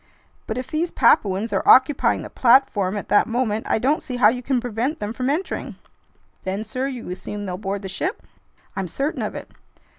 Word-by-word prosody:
"But 220 - -3
if 255 - -5
these 325 +3 0
Papuans 205 -8 +2
are - - +2
occupying 265 +2 +4
the - - -9
platform 230 -6 +3
at 205 - -6
that 205 - +4
moment, 225 -2 -1
I - - +3
don't 275 +7 +1
see 255 - -6
how 245 -4 +6
you 250 +2 -3
can 255 0 0
prevent 245 +5 -2
them 210 +1 -4
from 255 +2 -2
entering." 325 +7 -3 0.7
"Then, 190 +3 -3
sir, 255 +5 -3
you 250 -8 -6
assume 205 +3 -6
they'll 180 -2 -4
board 200 0 -4
the - - -4
ship?" 360 - -3 0.5
"I'm 195 -2 -2
certain 275 - -2
of - - -3
it." - - -8
235 Hz, 200 wpm, -22 LUFS, 205-265 Hz, 0.7 s, how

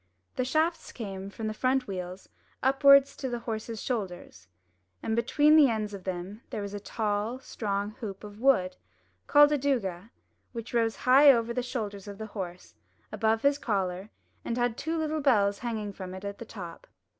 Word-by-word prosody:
The 255 - 0
shafts 315 +5 0
came 195 -4 -6
from 220 +2 -7
the 215 - -2
front 255 +3 +1
wheels 185 -1 -6 0.4
upwards 275 +1 +6
to 265 - -3
the 240 - -2
horse's 225 -1 -5
shoulders, 185 - -5 0.6
and 220 - 0
between 295 +6 +4
the 295 -4 +7
ends 215 -2 -2
of 195 -2 -8
them 185 +3 -5
there 210 - -4
was 200 0 -6
a 205 - -4
tall, 210 +3 -2
strong 205 -5 -3
hoop 200 -4 -6
of 205 0 -10
wood, 205 -9 +3 0.5
called 290 0 +7
a 295 - +2
douga, 225 -8 -1 0.4
which 230 0 -7
rose 230 -2 +2
high 275 +3 +8
over 235 -2 +1
the 250 - -1
shoulders 210 -5 -5
of 200 -1 -8
the 220 - -5
horse, 180 -3 -6 0.4
above 220 0 +1
his 280 +1 +3
collar, 195 -4 -2 0.3
and 235 - -3
had 245 -2 +1
two 325 +5 -3
little 310 -1 -1
bells 205 -7 +3
hanging 220 -4 -4
from 185 -1 -7
it 190 +1 -8
at 200 0 -5
the 230 - -7
top. 180 -7 -9
220 Hz, 180 wpm, -28 LUFS, 200-255 Hz, 0.6 s, high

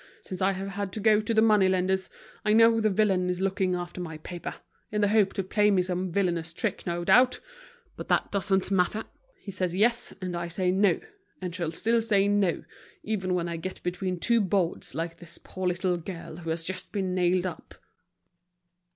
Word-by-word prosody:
Since 185 -1 -7
I 195 +1 +3
have 195 +1 -5
had 200 -1 -4
to - - -4
go 215 0 +4
to 215 - -3
the 220 -1 +4
money 210 -4 +5
lenders, 190 0 0 0.3
I 210 - +3
know 225 +1 +6
the 215 - +3
villain 190 -3 +2
is 180 0 -1
looking 190 -1 0
after 175 0 -5
my 160 -3 -6
paper, 175 +2 -7 0.4
in 210 0 0
the 205 - +3
hope 210 -2 +3
to 195 - -2
play 210 +2 +2
me 190 -3 +3
some 180 0 -2
villainous 170 -3 0
trick, - - -3
no 175 0 -1
doubt. 250 +7 +5 0.6
But - - -7
that - - +1
doesn't 195 -1 +1
matter. 195 +3 +1 0.4
He 200 - -7
says 180 -2 -2
"yes," 235 +4 +2
and 180 -2 -4
I 170 0 -3
say 180 +2 0
"no," 195 +1 +3 0.4
and 180 -2 -5
shall 170 -3 -2
still 230 +7 +1
say 200 -3 +2
"no," 205 -4 +1 0.4
even 190 -4 -1
when 175 -1 -1
I 170 -1 -3
get 185 +3 -6
between 180 0 -2
two 235 +5 +3
boards 190 -3 -1
like 165 0 -3
this 170 -1 -7
poor 185 0 -5
little 180 0 0
girl 170 -2 -8
who 165 -2 -6
has 165 +1 -1
just 185 +3 -5
been 190 -3 -1
nailed 180 0 +2
up." 180 -3 -7
185 Hz, 205 wpm, -27 LUFS, 175-205 Hz, 0.6 s, know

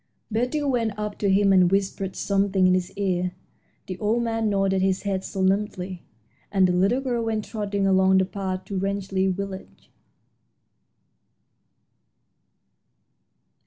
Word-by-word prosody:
Betty 250 +7 0
went 235 -7 0
up 210 -1 -4
to 200 - +1
him 195 0 +4
and 180 -1 +5
whispered 195 -1 -1
something 195 -1 +1
in 185 - +5
his 185 -1 -1
ear. 180 -2 -1 0.5
The 185 -1 -6
old 225 +3 +1
man 225 -1 0
nodded 195 -1 +1
his 190 0 +1
head 195 -2 -2
solemnly, 190 -2 -1 0.5
and 190 -2 +4
the - - +1
little 195 +9 +2
girl 245 -3 -1
went 220 -2 -2
trotting 205 -3 -2
along 190 0 +4
the 190 - +3
path 185 0 -4
to 195 -2 -3
Rangeley 195 -1 -1
Village. 190 0 -6
195 Hz, 130 wpm, -24 LUFS, 190-210 Hz, 0.5 s, and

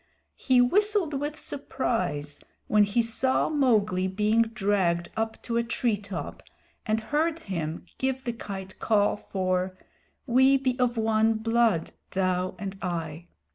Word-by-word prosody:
He 255 -2 +3
whistled 400 +4 +2
with 290 +2 -3
surprise 225 - -3 0.3
when 210 -1 +4
he 215 +4 +1
saw 255 +3 +1
Mowgli 215 -11 +2
being 210 +4 +2
dragged 195 -6 0
up 225 0 -2
to 235 -1 -2
a 235 - +2
treetop 205 -5 -3 0.5
and 215 +1 +2
heard 305 +8 0
him 170 - -4
give 265 0 -1
the 240 - -2
Kite 190 -4 -8
call 205 -2 +2
for 185 -2 -2 0.5
"We 265 +1 +5
be 260 -2 0
of 245 -1 +1
one 220 0 +2
blood, 225 -5 +1 0.2
thou 185 -1 0
and 195 -1 -6
I." 170 -2 -4
220 Hz, 135 wpm, -27 LUFS, 190-250 Hz, 0.5 s, We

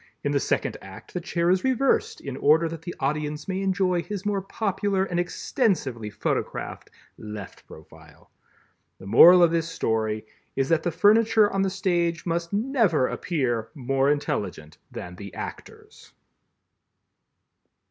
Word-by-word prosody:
In - - 0
the - - +2
second - - -1
act, - - -12
the 180 - -3
chair 170 0 0
is 185 0 +2
reversed 265 +1 +1
in 135 -2 -6
order 155 +4 +3
that 165 -1 -7
the 175 +2 -7
audience 150 +2 -2
may 190 0 -2
enjoy 185 -2 +1
his 205 +1 -6
more 205 -1 0
popular 195 -1 -1
and 175 -2 -2
extensively 170 - -1
photographed 105 - -4 0.3
left 105 -3 -9
profile. 80 - -16 0.7
The - - -13
moral 175 - +8
of 170 - +5
this 165 -1 0
story 110 -6 -1 0.3
is 135 0 0
that 165 -1 +3
the 175 - -1
furniture 210 +4 +4
on 195 - +1
the 195 - +1
stage 175 -3 -1
must 170 0 -2
never 210 - +2
appear 120 -9 -2
more 135 0 +1
intelligent 110 - -3
than 90 0 -8
the 100 -3 -9
actors. - - -10
170 Hz, 145 wpm, -25 LUFS, 135-195 Hz, 0.7 s, moral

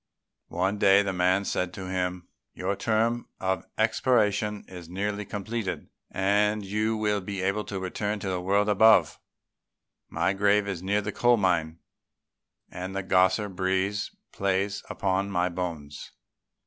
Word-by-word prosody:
One 95 +4 -1
day 100 0 +6
the 100 - -2
old 95 - -6
man 95 +2 +2
said 90 -2 -1
to 95 -1 -6
him, 90 -1 -3 0.3
"Your 95 +2 -2
term 115 +3 0
of 95 -2 -2
expiation 110 -2 +1
is 90 -3 -10
nearly 100 +3 -3
completed, 105 0 -4 0.2
and 105 +2 +1
you 110 +3 0
will 105 -1 0
be 95 0 -4
able 100 +2 0
to 95 - -4
return 105 +3 -2
to - - -4
the 90 -1 -2
world 100 +3 +2
above. 105 -5 +5 0.9
My 95 - 0
grave 100 +1 +2
is 95 -4 -4
near 100 +3 +1
the - - -4
coal 120 0 +3
mine, 85 -5 0 0.9
and 95 +2 -6
the 95 - -2
grosser 95 +2 +3
breeze 95 +1 -1 0.2
plays 100 +1 -1
upon 95 -1 -1
my 90 -2 +1
bones. 85 -5 -5
100 Hz, 150 wpm, -27 LUFS, 95-105 Hz, 0.9 s, day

